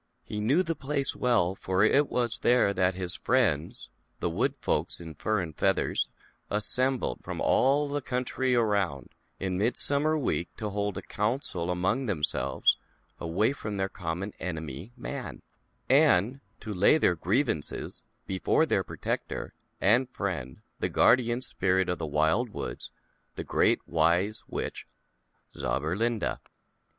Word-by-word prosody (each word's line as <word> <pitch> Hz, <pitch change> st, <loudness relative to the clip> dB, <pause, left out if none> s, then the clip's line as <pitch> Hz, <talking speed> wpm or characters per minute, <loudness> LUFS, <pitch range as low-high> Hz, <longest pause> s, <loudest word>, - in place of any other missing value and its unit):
He 105 Hz, -, -5 dB
knew 135 Hz, -, +3 dB
the 165 Hz, -2 st, -1 dB
place 140 Hz, -2 st, -1 dB
well, 105 Hz, -8 st, +2 dB
for 95 Hz, 0 st, 0 dB
it 140 Hz, +6 st, +4 dB
was 120 Hz, -2 st, -1 dB
there 120 Hz, -5 st, +4 dB
that 90 Hz, -1 st, +1 dB
his 90 Hz, -1 st, +2 dB
friends, 110 Hz, -, +1 dB, 0.3 s
the -, -, -1 dB
Wood -, -, 0 dB
Folks -, -, -1 dB
in 80 Hz, -2 st, -8 dB
Fur 110 Hz, +8 st, 0 dB
and 80 Hz, -5 st, -4 dB
Feathers, -, -, +1 dB, 0.4 s
assembled, 125 Hz, -, 0 dB
from -, -, -5 dB
all 140 Hz, +3 st, +3 dB
the 145 Hz, 0 st, -2 dB
country 125 Hz, 0 st, -1 dB
around, 100 Hz, -, +1 dB, 0.3 s
in 95 Hz, -1 st, -2 dB
Midsummei 140 Hz, +7 st, +1 dB
Week, 90 Hz, -10 st, -1 dB
to 105 Hz, -2 st, -3 dB
hold 100 Hz, 0 st, -2 dB
a -, -, -5 dB
Council 105 Hz, -, -2 dB
among 95 Hz, +9 st, 0 dB
them 85 Hz, -8 st, -2 dB
selves, 75 Hz, -, +2 dB, 0.4 s
away 95 Hz, +10 st, +1 dB
from 105 Hz, -7 st, -5 dB
their 95 Hz, 0 st, 0 dB
common 90 Hz, +3 st, -4 dB
enemy, 80 Hz, -, -5 dB
Man, -, -, -6 dB, 0.4 s
and 110 Hz, +10 st, +4 dB, 0.2 s
to 110 Hz, -, -5 dB
lay 100 Hz, +11 st, +5 dB
their 115 Hz, -, +3 dB
grievances 95 Hz, -, -1 dB, 0.2 s
before 95 Hz, -3 st, +2 dB
their -, -, +1 dB
protector -, -, -4 dB, 0.3 s
and 120 Hz, +7 st, +3 dB
friend, 85 Hz, -, -4 dB, 0.2 s
the -, -, 0 dB
Guardian 120 Hz, 0 st, +4 dB
Spirit 95 Hz, -6 st, 0 dB
of 90 Hz, -, -1 dB
the 80 Hz, -, -3 dB
Wild 80 Hz, -, +2 dB
Woods, -, -, -5 dB, 0.5 s
the -, -, -4 dB
Great -, -, +2 dB
Wise 90 Hz, +6 st, +2 dB
Witch -, -, -5 dB, 0.7 s
Zauberlinda. 100 Hz, -, -1 dB
105 Hz, 140 wpm, -28 LUFS, 90-125 Hz, 0.7 s, lay